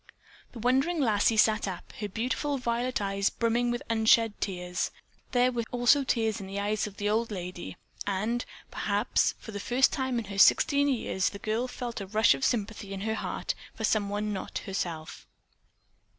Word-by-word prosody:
The - - -9
wondering 265 +9 +2
lassie 220 -3 +3
sat 215 -1 +4
up, 185 -3 -7
her 210 -1 -3
beautiful 255 +7 -1
violet 245 0 -1
eyes 200 0 0
brimming 235 +1 +1
with 240 0 -2
unshed 225 0 +4
tears. 180 -2 -2 0.4
There 250 0 +3
were 240 -1 -1
also 245 +3 +4
tears 225 -4 0
in 190 - -7
the 195 +1 -4
eyes 210 +1 0
of 200 - -11
the 205 - -1
old 225 +2 +1
lady, 180 -3 -6 0.3
and, 215 +5 0 0.3
perhaps, 205 +3 +1
for 220 - -10
the 205 - -5
first 245 +6 +3
time 260 -2 -1
in 230 - -2
her 200 0 -5
sixteen 285 +6 +5
years 225 -8 0
the 200 - -8
girl 220 +4 -1
felt 245 -3 -5
a 195 - -6
rush 215 +3 +4
of - - -5
sympathy 215 -4 -1
in 190 - -6
her 220 +2 -1
heart - - -3 0.2
for 220 - -6
someone 210 0 0
not 190 - -4
herself. 170 -5 -4
220 Hz, 180 wpm, -29 LUFS, 200-240 Hz, 0.4 s, sixteen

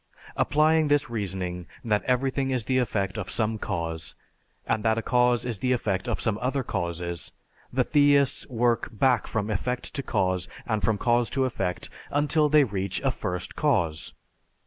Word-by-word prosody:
Applying 155 +1 +3
this 145 -3 +2
reasoning 95 -5 -3 0.2
that 105 -2 +2
everything 135 +1 +1
is 130 -3 0
the 130 +3 +1
effect 105 -4 -1
of 95 -3 -5
some 110 +2 -1
cause, 80 -5 -3 0.5
and 110 - 0
that 110 -1 +2
a 115 - -1
cause 125 -1 +2
is 115 -5 -2
the 130 +3 +1
effect 105 -3 -1
of 115 - -1
some 110 -1 0
other 130 +2 0
causes, 85 -4 -3 0.4
the 125 0 +2
theists 145 -1 +3
work 120 -1 +1
back 125 +2 +2
from 110 -1 -2
effect 125 +5 -2
to 140 - -2
cause 95 -7 0 0.2
and 110 -2 -1
from 110 0 +1
cause 120 +1 +2
to 135 -1 +1
effect 95 -8 -2 0.2
until 150 +1 +2
they 150 0 +6
reach 100 -5 -2
a - - +3
First 90 0 -4
Cause. 85 - 0
115 Hz, 170 wpm, -26 LUFS, 95-130 Hz, 0.5 s, they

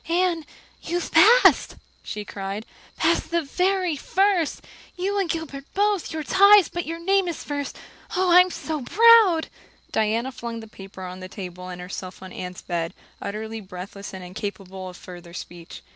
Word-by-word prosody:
"Anne, 345 -1 +1 0.4
you've 345 +1 -3
passed," - - +6 0.3
she 210 -1 -6
cried, 200 +2 -5 0.3
"passed - - +1
the 340 -1 +1
very 365 +2 0
first 370 +2 +1 0.3
you 395 +3 -1
and 380 -4 0
Gilbert 320 -4 -4
both 410 -2 +1
you're 315 -1 -3
ties 400 - +6
but 345 -2 -4
your 330 +1 -3
name 385 +2 +2
is 340 - -4
first. 285 -1 -4 0.4
Oh, 365 -1 +2
I'm 360 +1 +7
so 315 -4 -4
proud!" 425 - +6 0.4
Diana 225 +4 0
flung 235 -2 -6
the 220 - -10
paper 195 -2 -11
on 185 0 -7
the 185 - -7
table 180 -2 -8
and 180 -1 -7
herself 185 +1 -7
on 185 - -9
Anne's 180 0 -7
bed, 170 -1 -3 0.3
utterly 220 +2 -5
breathless 195 +1 -8
and 190 -1 -8
incapable 190 0 -6
of 180 - -11
further 175 -1 -11
speech. 170 -1 -9
255 Hz, 160 wpm, -24 LUFS, -, 0.4 s, I'm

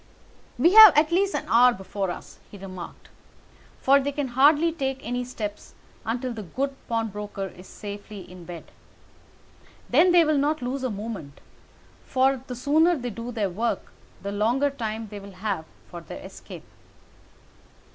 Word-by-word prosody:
"We 335 +9 +4
have 430 -7 +10
at 305 +2 +4
least 390 +3 +2
an - - -2
hour 245 +2 +6
before 195 -1 -4
us," 175 - -8
he 205 - -11
remarked, 185 -3 -9 0.7
"for 275 +1 +5
they 280 +1 -2
can 285 -2 -3
hardly 290 +6 +4
take 270 -4 -2
any 245 +1 -2
steps 215 -4 -7 0.3
until 245 +2 -2
the 220 - -6
good 270 - -3
pawnbroker 210 -3 -3
is 180 +1 -14
safely 205 0 -8
in 180 -1 -12
bed. 170 -1 -10 1.2
Then 325 +8 +5
they 345 -1 +6
will 305 -2 +2
not 295 0 0
lose 260 +2 -3
a 255 - 0
minute, 205 -9 -6 0.6
for 265 0 +1
the 250 - -5
sooner 310 +7 +3
they 245 -5 -4
do 230 +3 -6
their 210 -5 -1
work 225 +6 -2 0.3
the 200 - -3
longer 240 +8 +1
time 225 -4 -4
they 205 0 -7
will 200 0 -11
have 185 -3 -3 0.2
for 175 -1 -9
their 165 - -9
escape. - - -11
240 Hz, 160 wpm, -25 LUFS, 205-280 Hz, 1.2 s, have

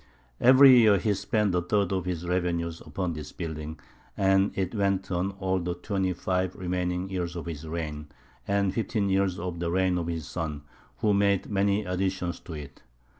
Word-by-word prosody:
Every 130 +1 +8
year 105 -3 +6
he 105 +3 +1
spent 105 0 0
a 90 - +2
third 100 +2 0
of 95 -2 -1
his 90 -1 -3
revenues 85 -2 -1
upon 90 -3 -3
this 75 -1 -7
building; 80 -2 -6 0.4
and 95 0 +3
it 95 -2 -1
went 100 -2 0
on 90 +2 -1
all 95 -1 -1
the 90 0 -3
twenty 95 +1 -1
five 90 +1 -1
remaining 90 0 -2
years 90 -2 -3
of 85 - -5
his 80 -2 -6
reign, 75 -2 -4 0.4
and 100 -1 +1
fifteen 105 -2 -1
years 95 -1 +1
of 85 0 -4
the 85 -1 -1
reign 90 0 +1
of 85 - -3
his 85 -3 -3
son, 75 -4 -4 0.4
who 105 -2 +3
made 100 0 +2
many 100 +1 +1
additions 90 -1 -2
to 85 - -9
it. 70 -3 -9
90 Hz, 180 wpm, -27 LUFS, 85-100 Hz, 0.4 s, Every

